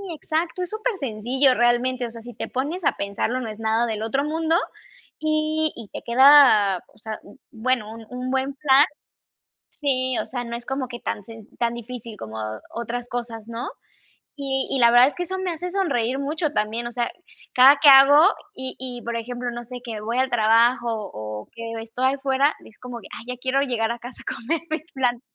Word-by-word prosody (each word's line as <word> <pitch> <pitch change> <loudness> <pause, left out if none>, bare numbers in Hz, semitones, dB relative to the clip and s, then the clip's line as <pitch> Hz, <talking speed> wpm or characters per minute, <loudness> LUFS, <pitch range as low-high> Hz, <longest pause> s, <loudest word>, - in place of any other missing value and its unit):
exacto, 325 +4 -2
es 360 - -4
supersencillo 270 - +1
realmente. 245 +1 +2
O - - -10
sea, 230 0 -9
si 240 +1 -10
te - - -5
pones 300 +8 -3
a - - +4
pensarlo 200 +5 -2
no 235 -3 -4
es 215 0 -8
nada 225 +1 +1
del 220 -2 -3
otro 270 +5 0
mundo, 320 +2 0 0.6
y 310 0 +1
y 230 -3 -8
te - - -7
queda 245 -6 +7 0.2
o - - -24
sea, 215 0 -7 0.3
bueno, 230 -1 -1
un 225 0 -10
un 250 +1 -4
buen 265 +1 -1
flan 280 0 +5 0.9
sí, 260 -3 -1
o - - -4
sea, 245 -1 -4
no 235 0 -5
es 240 0 -10
como 265 -1 -3
que 240 -1 -7
tan 205 - -4
sen 225 0 -12
tan 235 -1 0
difícil 235 -1 -8
como 110 0 -8 0.4
otras 235 +1 -4
cosas, 235 -3 -5
¿no? 235 +2 -4 0.7
Y 270 -1 -1
y 270 - 0
la 235 -1 +6
verdad 245 +2 +7
es 290 - -4
que 355 - -2
eso 375 +2 -4
me 365 - -1
hace 350 +2 -5
sonreír 270 - 0
mucho 305 +2 -1
también, 225 -1 -1
o - - -6
sea, 240 0 -1 0.4
cada 265 +3 +8
que 295 - +9
hago 275 +2 +9 0.3
y 260 -8 -5
y, 250 -2 -5
por 235 0 -4
ejemplo 245 +1 -4
no 240 0 -6
sé, 250 +1 -8
que 230 -3 -5
voy 230 +3 -2
al 260 0 +2
trabajo, 235 +1 +3 0.3
o 105 0 -7
que 230 0 -7
estoy 250 +4 0
afuera, 275 +1 +1
es 220 - -16
como 250 -1 -7
que: 210 - -13
"Ay, - - -10
ya - - -10
quiero 260 +1 +1
llegar 235 -5 0
a 235 - -4
casa 245 +1 -10
a - - -4
comerme 325 +7 -3
el 305 - -15
flan". 245 -3 0
250 Hz, 205 wpm, -23 LUFS, 230-275 Hz, 0.9 s, que